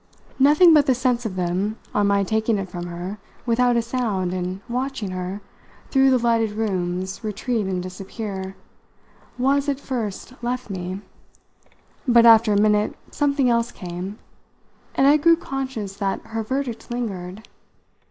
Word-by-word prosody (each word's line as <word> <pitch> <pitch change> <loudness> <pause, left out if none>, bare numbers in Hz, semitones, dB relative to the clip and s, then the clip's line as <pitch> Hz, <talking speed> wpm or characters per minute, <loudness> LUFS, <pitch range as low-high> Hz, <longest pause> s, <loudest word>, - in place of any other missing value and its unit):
Nothing 300 +5 +7
but 300 -2 +5
the 260 - +4
sense 245 -1 0
of 190 - -7
them 185 +4 -1 0.2
on 205 -1 +2
my 200 0 +3
taking 220 +2 +1
it 195 -2 -5
from 175 -1 -5
her 175 +4 -6 0.3
without 245 0 +3
a 235 - +1
sound 220 -7 -1
and 185 +1 -3
watching 250 -4 -3
her, 185 +2 -4 0.5
through 270 -1 +5
the 260 - +4
lighted 230 -3 +1
rooms, 190 -3 -2
retreat 215 0 -2
and 185 -2 -2
disappear 190 +1 -6 0.8
was 275 +3 +2
at 280 -1 -1
first 240 -4 -4
left 245 -2 -3
me; 185 +1 -4 1.1
but 235 -1 +6
after 225 -1 +7
a 205 - +3
minute 210 0 +2 0.2
something 280 -2 +1
else 235 0 +2
came, 180 +3 -6 0.8
and 270 - +3
I 290 +2 +7
grew 335 +3 +5
conscious 260 - -5
that 195 -1 -1
her 225 0 -3
verdict 255 +1 -3
lingered. 205 -5 -4
220 Hz, 150 wpm, -23 LUFS, 190-250 Hz, 1.1 s, Nothing